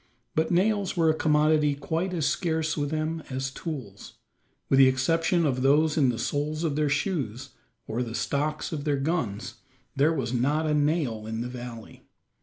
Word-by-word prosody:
But 160 Hz, +1 st, +1 dB
nails 195 Hz, +1 st, +1 dB
were 165 Hz, -2 st, +4 dB
a -, -, 0 dB
commodity 150 Hz, -1 st, +3 dB
quite 160 Hz, +6 st, -2 dB
as 165 Hz, -5 st, -1 dB
scarce 160 Hz, +1 st, 0 dB
with 145 Hz, -2 st, -1 dB
them 155 Hz, +1 st, -2 dB
as 130 Hz, 0 st, -3 dB
tools. 130 Hz, -, -7 dB, 0.5 s
With 135 Hz, -, +3 dB
the 135 Hz, -, +8 dB
exception 165 Hz, +6 st, +2 dB
of 130 Hz, -3 st, 0 dB
those 150 Hz, +3 st, +3 dB
in 140 Hz, -5 st, +3 dB
the 120 Hz, -, -1 dB
soles 150 Hz, +6 st, -2 dB
of 155 Hz, -4 st, 0 dB
their 150 Hz, -1 st, +1 dB
shoes, 140 Hz, -, -2 dB, 0.4 s
or 115 Hz, +3 st, -3 dB
the 115 Hz, -2 st, -4 dB
stocks 150 Hz, +5 st, -1 dB
of 150 Hz, -3 st, -4 dB
their 145 Hz, -1 st, +1 dB
guns, 125 Hz, -, -2 dB, 0.4 s
there 145 Hz, +3 st, +3 dB
was 130 Hz, -7 st, -2 dB
not 145 Hz, +6 st, +1 dB
a 155 Hz, -, +1 dB
nail 145 Hz, -8 st, 0 dB
in 110 Hz, +1 st, -3 dB
the 120 Hz, -, -4 dB
valley. 120 Hz, -2 st, -9 dB
150 Hz, 180 wpm, -27 LUFS, 130-160 Hz, 0.5 s, the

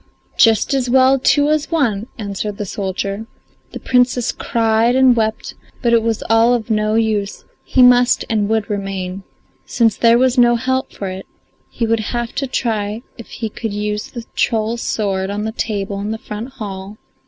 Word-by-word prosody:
"Just 225 Hz, +2 st, +4 dB
as 260 Hz, -2 st, 0 dB
well 265 Hz, +1 st, +4 dB
two 290 Hz, +3 st, +3 dB
as 305 Hz, 0 st, 0 dB
one," 235 Hz, -10 st, 0 dB
answered 205 Hz, -1 st, -4 dB
the 210 Hz, -, -4 dB
soldier. 195 Hz, +2 st, -4 dB, 0.4 s
The -, -, -7 dB
Princess 250 Hz, -1 st, +1 dB
cried 230 Hz, +1 st, +1 dB
and 260 Hz, -2 st, +5 dB
wept; 220 Hz, -1 st, -2 dB, 0.3 s
but 235 Hz, -1 st, +2 dB
it 230 Hz, -, +5 dB
was 225 Hz, -1 st, -1 dB
all 225 Hz, +2 st, +4 dB
of 225 Hz, -1 st, -4 dB
no 215 Hz, 0 st, +1 dB
use, 215 Hz, -3 st, -1 dB, 0.2 s
he 255 Hz, -, +3 dB
must 245 Hz, 0 st, +5 dB
and 215 Hz, -3 st, 0 dB
would 220 Hz, -2 st, 0 dB
remain. 195 Hz, -2 st, -4 dB, 0.5 s
Since 225 Hz, -3 st, +1 dB
there 230 Hz, 0 st, +5 dB
was 255 Hz, 0 st, +2 dB
no 240 Hz, 0 st, +5 dB
help 260 Hz, +2 st, -1 dB
for 195 Hz, -, -5 dB
it 190 Hz, +1 st, -8 dB, 0.4 s
he 230 Hz, -, -2 dB
would 225 Hz, 0 st, +1 dB
have 235 Hz, +2 st, -3 dB
to 275 Hz, -, -1 dB
try 220 Hz, -3 st, -2 dB, 0.2 s
if 230 Hz, -, -9 dB
he 225 Hz, -, -5 dB
could 220 Hz, 0 st, -5 dB
use 210 Hz, 0 st, -3 dB
the 235 Hz, -2 st, -8 dB
troll's 225 Hz, +1 st, 0 dB
sword 195 Hz, -3 st, -1 dB
on 205 Hz, +1 st, -3 dB
the 220 Hz, -, -2 dB
table 200 Hz, -3 st, -3 dB
in 205 Hz, +1 st, -4 dB
the 220 Hz, -, -3 dB
front 220 Hz, +4 st, -7 dB
hall. 200 Hz, -4 st, -7 dB
225 Hz, 180 wpm, -18 LUFS, 205-245 Hz, 0.5 s, and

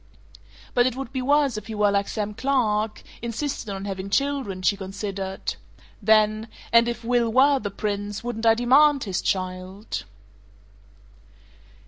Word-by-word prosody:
"But 245 Hz, 0 st, +4 dB
it 255 Hz, -, -2 dB
would 270 Hz, 0 st, -6 dB
be 260 Hz, -, -1 dB
worse 280 Hz, -2 st, +2 dB
if 215 Hz, -, -7 dB
he 220 Hz, -, -5 dB
were 210 Hz, -1 st, +3 dB
like 200 Hz, 0 st, +1 dB
Sam 210 Hz, -1 st, -3 dB
Clark 220 Hz, -4 st, 0 dB, 0.2 s
insisted 235 Hz, +1 st, -3 dB
on 195 Hz, 0 st, -5 dB
having 195 Hz, -1 st, -4 dB
children," 265 Hz, -7 st, -1 dB
she 200 Hz, -, +3 dB
considered; 195 Hz, 0 st, -4 dB, 0.5 s
then, 215 Hz, +1 st, +3 dB, 0.3 s
"If 235 Hz, 0 st, +3 dB
Will 235 Hz, -1 st, +1 dB
were 270 Hz, +3 st, +5 dB
the 205 Hz, -, -4 dB
Prince, 205 Hz, +1 st, -3 dB
wouldn't 230 Hz, -1 st, -2 dB
I 225 Hz, -, +6 dB
DEMAND 275 Hz, +4 st, +4 dB
his 190 Hz, -4 st, -2 dB
child?" 185 Hz, +2 st, -3 dB
220 Hz, 140 wpm, -24 LUFS, 200-250 Hz, 0.5 s, I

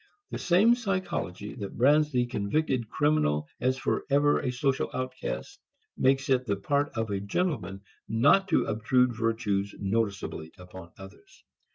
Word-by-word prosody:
The -, -, -4 dB
same 195 Hz, +7 st, +4 dB
psychology 185 Hz, -, -3 dB
that 100 Hz, -4 st, -7 dB
brands 150 Hz, +4 st, +4 dB
the 125 Hz, -2 st, +1 dB
convicted 120 Hz, +1 st, -1 dB
criminal 115 Hz, -, +1 dB
as 130 Hz, +1 st, +1 dB
forever 145 Hz, +2 st, +1 dB
a 125 Hz, -, -2 dB
social 130 Hz, +1 st, 0 dB
outcast 130 Hz, 0 st, -5 dB, 0.4 s
makes 135 Hz, +1 st, +2 dB
it 130 Hz, -2 st, +1 dB
the 100 Hz, -, +1 dB
part 140 Hz, +8 st, 0 dB
of 110 Hz, -2 st, -2 dB
a 100 Hz, -, -1 dB
gentleman 100 Hz, -, -2 dB, 0.3 s
not 140 Hz, -, +4 dB
to 175 Hz, -, +2 dB
obtrude 120 Hz, +3 st, +2 dB
virtues 110 Hz, -3 st, -1 dB
noticeably 100 Hz, -6 st, -2 dB
upon 90 Hz, -1 st, -12 dB
others. 95 Hz, 0 st, -15 dB
125 Hz, 140 wpm, -28 LUFS, 100-145 Hz, 0.4 s, same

